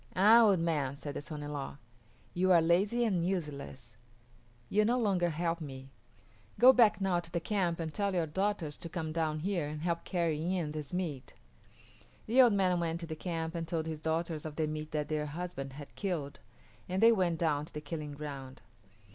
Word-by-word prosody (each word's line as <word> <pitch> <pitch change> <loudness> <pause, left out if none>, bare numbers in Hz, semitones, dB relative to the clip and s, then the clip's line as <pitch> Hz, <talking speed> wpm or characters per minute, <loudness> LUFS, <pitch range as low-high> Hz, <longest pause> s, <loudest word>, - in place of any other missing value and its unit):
"Ah, 215 +5 +7
old 205 -4 +5
man," 150 -5 0
said 145 0 -6
the - - -4
son 150 0 -7
in 145 0 -5
law, 140 -1 -5 0.6
"you 185 +1 +2
are 175 - +7
lazy 195 +9 +2
and 185 -6 +1
useless. 140 - -4 0.7
You 210 +8 +3
no 240 +4 +2
longer 195 -7 +2
help 165 +1 -2
me. 135 -2 -8 0.7
Go 255 +2 +8
back 230 -6 +5
now 190 -3 +1
to 170 - -9
the 170 - 0
camp 175 -2 -1
and 160 -2 -4
tell 200 +1 -1
your 170 -2 +2
daughters 180 -2 -2
to 170 - -5
come 160 -2 -4
down 155 -1 -1
here 175 -4 -1
and 150 +1 -6
help 170 -1 -1
carry 170 0 -1
in 165 -5 -2
this 150 -2 -5
meat." 165 -8 -4 0.9
The 245 +4 +5
old 240 -4 +6
man 185 -3 +2
went 165 -1 -1
to - - -4
the 160 -1 -5
camp 165 -1 -3
and 165 -1 -4
told 160 -1 -2
his 160 -1 -5
daughters 160 -1 -1
of 155 -2 -6
the 160 - 0
meat 155 0 -4
that 150 -1 -2
their 150 0 -1
husband 150 -4 -5
had 145 0 -10
killed, 170 -8 -3 0.5
and 185 +1 -1
they 230 +2 +7
went 180 -6 +1
down 150 -3 0
to - - -16
the - - -2
killing 150 0 -6
ground. 135 -4 -8
165 Hz, 205 wpm, -32 LUFS, 150-185 Hz, 0.9 s, Go